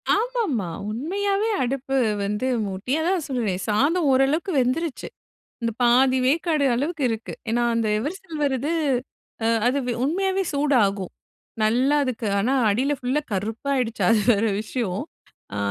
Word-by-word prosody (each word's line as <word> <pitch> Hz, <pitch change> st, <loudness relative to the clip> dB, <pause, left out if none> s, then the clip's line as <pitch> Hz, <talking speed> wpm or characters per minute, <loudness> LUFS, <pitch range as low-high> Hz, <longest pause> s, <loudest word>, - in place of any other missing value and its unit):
ஆமா, -, -, -1 dB
ஆமா, 225 Hz, -, -1 dB, 0.2 s
உண்மையாவே 395 Hz, -, -1 dB
அடுப்பு 270 Hz, +1 st, -2 dB, 0.3 s
வந்து 210 Hz, +5 st, -1 dB, 0.2 s
மூட்டி 195 Hz, +6 st, -5 dB
அதான் 345 Hz, -1 st, 0 dB
சொல்றேனே! 235 Hz, -8 st, -1 dB
சாதம் 290 Hz, +9 st, +2 dB
ஓரளவுக்கு 275 Hz, +8 st, +2 dB
வெந்துருச்சு. 265 Hz, +5 st, -1 dB, 0.5 s
இந்த 230 Hz, 0 st, 0 dB
பாதி 255 Hz, +2 st, +4 dB
வேக்காடு 310 Hz, 0 st, +1 dB
அளவுக்கு 295 Hz, +4 st, -2 dB
இருக்கு. 225 Hz, 0 st, -4 dB, 0.2 s
ஏனா, 240 Hz, +1 st, +1 dB
அந்த 230 Hz, -1 st, +1 dB
எவர்சில்வர் 300 Hz, -, -2 dB
இது 295 Hz, +5 st, -2 dB, 0.7 s
அ -, -, +3 dB, 0.2 s
அது 255 Hz, +3 st, +1 dB
வெ 245 Hz, -, 0 dB
உண்மையாவே 385 Hz, +5 st, 0 dB
சூடாகும். 220 Hz, -10 st, +1 dB, 0.5 s
நல்லா 250 Hz, +7 st, +3 dB
அதுக்கு 250 Hz, -4 st, -3 dB
ஆனா 225 Hz, +6 st, +1 dB, 0.2 s
அடியில 260 Hz, +8 st, +1 dB
ஃபுல்லா 260 Hz, +4 st, 0 dB
கருப்பாயிடுச்சு. 230 Hz, +4 st, -2 dB
அது 225 Hz, -, +4 dB
வேற 220 Hz, 0 st, +2 dB, 0.2 s
விஷயம் 215 Hz, -4 st, -3 dB, 0.5 s
ஆ -, -, -3 dB
265 Hz, 135 wpm, -23 LUFS, 225-310 Hz, 0.7 s, பாதி